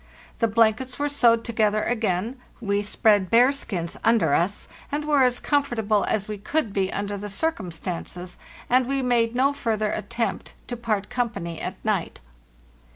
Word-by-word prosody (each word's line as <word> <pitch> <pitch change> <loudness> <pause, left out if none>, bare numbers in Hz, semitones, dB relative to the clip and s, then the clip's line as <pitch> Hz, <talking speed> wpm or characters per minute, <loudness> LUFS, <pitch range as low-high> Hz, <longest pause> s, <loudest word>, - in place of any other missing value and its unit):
The 230 - +3
blankets 230 +3 +2
were 290 0 0
sewed 235 -5 +4
to 235 - -5
gether 215 -1 +2
again, 225 +1 -1 0.2
we 200 -3 0
spread 205 -2 +2
bearskins 230 -8 +2
under 220 -10 +3
us, 180 +6 0 0.2
and 295 +1 -2
were 295 -2 +3
as 250 -1 +2
comfortable 220 -8 +1
as 205 -1 -1
we 210 -1 -5
could 230 0 -1
be 190 -1 0
under 205 0 -3
the 205 +1 -6
circumstances; 180 - -4 0.3
and 255 0 +3
we 275 0 0
made 240 -2 +2
no 275 +3 +3
further 220 -6 -1
attempt 230 +3 -3
to 245 - -2
part 215 -4 -2
company 210 -10 -3
at 185 - -4
night. 205 -5 -1
220 Hz, 160 wpm, -24 LUFS, 200-245 Hz, 0.3 s, sewed